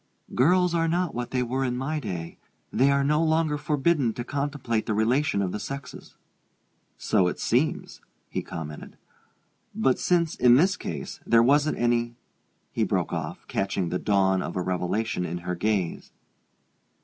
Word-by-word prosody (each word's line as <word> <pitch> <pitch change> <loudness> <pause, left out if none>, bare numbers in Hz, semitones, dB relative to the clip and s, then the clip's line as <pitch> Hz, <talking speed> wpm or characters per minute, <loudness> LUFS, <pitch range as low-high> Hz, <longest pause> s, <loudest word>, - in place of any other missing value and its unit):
"Girls 180 +6 +3
are 165 -1 +2
not 175 0 0
what 120 0 -4
they 125 -1 0
were 130 +2 -1
in 125 -1 -1
my 150 +4 -2
day; 85 - -6 0.3
they 135 +2 +4
are 140 0 +3
no 150 +3 +2
longer 160 -1 +2
forbidden 145 -3 +1
to 120 - -5
contemplate 140 -4 -2
the 110 - 0
relation 115 0 +1
of 90 - -2
the 105 - -4
sexes." 140 +4 -8 0.8
"So 90 - +2
it 90 - -3
seems!" - - 0 0.3
he - - -3
commented. 75 -2 -8 0.8
"But 210 -12 +2
since, 170 -3 +2
in 120 0 +5
this 185 +8 +4
case, 70 -5 -6
there 115 0 +4
wasn't 145 +4 +3
any 120 0 +1 0.3
" - - -45
he - - +1
broke - - -1
off, - - -5
catching 95 -2 -1
the 90 +2 -1
dawn 95 -2 +2
of - - -5
a 90 - 0
revelation 90 +3 -1
in 90 0 -3
her 90 - -1
gaze. 95 -1 -1
125 Hz, 165 wpm, -26 LUFS, 100-150 Hz, 0.8 s, in